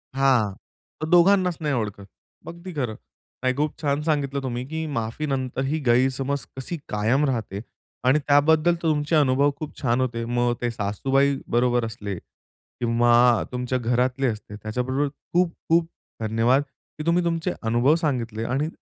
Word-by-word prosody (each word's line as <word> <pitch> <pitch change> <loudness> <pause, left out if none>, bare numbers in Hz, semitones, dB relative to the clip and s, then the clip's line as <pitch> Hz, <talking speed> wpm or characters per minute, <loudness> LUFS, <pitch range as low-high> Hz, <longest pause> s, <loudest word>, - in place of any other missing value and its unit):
हां. 130 -7 +3 0.5
तर 155 - -2
दोघांनाचं 180 0 +4
नाही 150 -2 0
ओळखत. 105 -4 -3 0.4
अगदी 170 +2 -8
खरं. 125 -8 -2 0.5
नाही 130 0 +1
खूप 150 +2 -2
छान 145 -1 0
सांगितलं 140 -3 0
तुम्ही 125 -1 -3
की 160 +2 -3
माफी 115 +6 -2
नंतर 130 -2 -2
ही 155 +4 -1
गैरसमज 130 +3 +1
कशी 135 +6 -4
कायम 110 +8 +2
राहते. 110 -7 -2 0.4
आणि 130 +4 +4
त्याबद्दल 155 +4 +4
तर 170 - -7
तुमचे 150 +1 +1
अनुभव 140 -1 +3
खूप 155 -1 -7
छान 120 -1 +1
होते. 120 -2 -2
मग 120 0 +1
ते 120 - 0
सासूबाई 135 +7 +1 0.2
बरोबर 120 -1 +2
असले. 105 -3 -5 0.6
किंवा 120 0 +4
तुमच्या 125 0 -1
घरातले 125 +2 +1
असते. 105 -2 -5
त्याच्याबरोबर 125 +7 -2 0.3
खूप-खूप 170 -1 +1 0.3
धन्यवाद 115 +5 +2 0.4
की 155 - -5
तुम्ही 170 +1 +2
तुमचे 170 +1 -1
अनुभव 120 +6 +3
सांगितले. 120 -9 -2
आणि 140 +6 -1
130 Hz, 145 wpm, -24 LUFS, 120-150 Hz, 0.6 s, दोघांनाचं